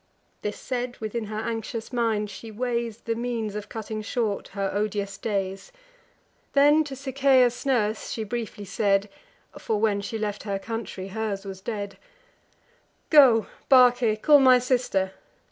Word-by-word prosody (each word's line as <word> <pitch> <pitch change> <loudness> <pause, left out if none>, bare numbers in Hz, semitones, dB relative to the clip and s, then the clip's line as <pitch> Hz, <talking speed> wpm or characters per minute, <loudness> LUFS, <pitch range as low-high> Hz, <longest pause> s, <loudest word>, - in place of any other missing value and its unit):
This 210 0 -4
said, 245 -1 -4
within 220 +1 -4
her 215 0 -6
anxious 225 +1 -4
mind 220 -3 0
she 225 - -9
weighs 235 0 -3
The 230 - -2
means 230 -2 -3
of 210 0 -6
cutting 220 -1 -5
short 215 -1 -2
her 195 -1 -3
odious 205 -1 -2
days. 195 - -3 0.8
Then 290 +2 +5
to 275 -2 -6
Sichaeus' 265 -2 +2
nurse 220 -5 0
she 225 - -3
briefly 215 -2 -5
said 195 +1 +1 0.5
(For, 215 -2 -1
when 205 -2 +1
she 215 +3 -4
left 210 -1 -3
her 200 -2 -2
country, 200 -3 -6
hers 210 -1 -3
was 190 -1 -7
dead): 200 -2 -5 1.1
"Go, 260 -8 +7 0.2
Barce, 245 -4 +5
call 295 -2 +7
my 260 -2 +7
sister. 245 -7 0
220 Hz, 145 wpm, -25 LUFS, 205-245 Hz, 1.1 s, Go